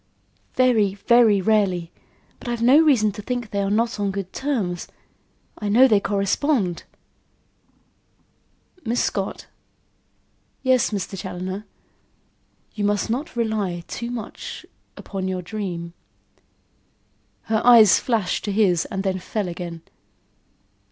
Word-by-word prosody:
"Very, 225 Hz, -6 st, +3 dB
very 220 Hz, -1 st, +4 dB
rarely. 185 Hz, -5 st, +1 dB, 0.5 s
But -, -, -11 dB
I've 240 Hz, -1 st, -2 dB
no 260 Hz, +5 st, +7 dB
reason 260 Hz, -10 st, +4 dB
to 205 Hz, +1 st, -8 dB
think 245 Hz, -1 st, -4 dB
they 200 Hz, -, -1 dB
are 195 Hz, -, -1 dB
not 225 Hz, +2 st, 0 dB
on 200 Hz, -1 st, 0 dB
good 195 Hz, -1 st, -5 dB
terms. 220 Hz, -11 st, -2 dB, 0.7 s
I 210 Hz, -, -3 dB
know 245 Hz, +6 st, +6 dB
they 215 Hz, -5 st, +4 dB
correspond." 200 Hz, -, 0 dB, 2.0 s
"Miss 235 Hz, +2 st, 0 dB
Scott?" 195 Hz, -1 st, -3 dB, 1.2 s
"Yes, 260 Hz, -2 st, +3 dB
Mr. 200 Hz, -2 st, -4 dB
Challoner." 190 Hz, +2 st, -6 dB, 1.1 s
"You 210 Hz, -, -4 dB
must 205 Hz, +2 st, 0 dB
not 265 Hz, +5 st, -3 dB
rely 210 Hz, -7 st, -1 dB
too 235 Hz, +1 st, -5 dB
much 235 Hz, -3 st, -7 dB, 0.3 s
upon 190 Hz, -2 st, -5 dB
your 185 Hz, -1 st, -3 dB
dream." 170 Hz, -3 st, -5 dB, 1.5 s
Her 220 Hz, -1 st, 0 dB
eyes 225 Hz, -7 st, +7 dB
flashed 220 Hz, -7 st, -1 dB
to 205 Hz, -, -2 dB
his 195 Hz, -5 st, +2 dB
and 195 Hz, -2 st, -4 dB
then 190 Hz, -1 st, -1 dB
fell 205 Hz, +2 st, -3 dB
again. 170 Hz, -1 st, -6 dB
205 Hz, 120 wpm, -22 LUFS, 190-235 Hz, 2.0 s, no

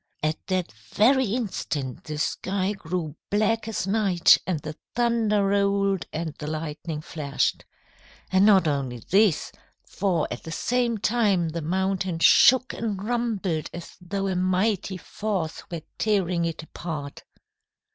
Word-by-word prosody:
"At 155 Hz, +1 st, -2 dB
that 185 Hz, -2 st, -1 dB
very 215 Hz, -, +2 dB
instant 185 Hz, -, -3 dB
the 150 Hz, -1 st, -5 dB
sky 190 Hz, +5 st, -1 dB
grew 165 Hz, -5 st, -4 dB
black 215 Hz, +2 st, +1 dB
as 220 Hz, -4 st, -2 dB
night, 195 Hz, -4 st, +4 dB
the 155 Hz, -4 st, -3 dB, 0.2 s
thunder 230 Hz, -4 st, +2 dB
rolled 200 Hz, -1 st, +1 dB
and 160 Hz, -1 st, -3 dB
the 150 Hz, -, -5 dB
lightning 155 Hz, 0 st, -4 dB
flashed. 145 Hz, -3 st, -2 dB, 0.7 s
And 190 Hz, 0 st, +4 dB
not 195 Hz, -5 st, +6 dB
only 135 Hz, -4 st, -1 dB
this, 200 Hz, -3 st, +3 dB, 0.4 s
for 180 Hz, -5 st, 0 dB
at -, -, -5 dB
the 160 Hz, -, -8 dB
same 240 Hz, +4 st, 0 dB
time 205 Hz, -6 st, +2 dB
the 165 Hz, +1 st, -4 dB
mountain 190 Hz, +2 st, -1 dB
shook 255 Hz, +9 st, +6 dB
and 205 Hz, -4 st, -3 dB
rumbled 215 Hz, -9 st, -1 dB
as 175 Hz, -, -9 dB
though 195 Hz, +2 st, -3 dB
a 190 Hz, -, -1 dB
mighty 185 Hz, +1 st, 0 dB
force 190 Hz, -4 st, -3 dB
were 170 Hz, -3 st, -5 dB, 0.2 s
tearing 185 Hz, -5 st, +1 dB
it 165 Hz, -1 st, -4 dB
apart." 155 Hz, -3 st, -6 dB
185 Hz, 135 wpm, -25 LUFS, 160-210 Hz, 0.7 s, not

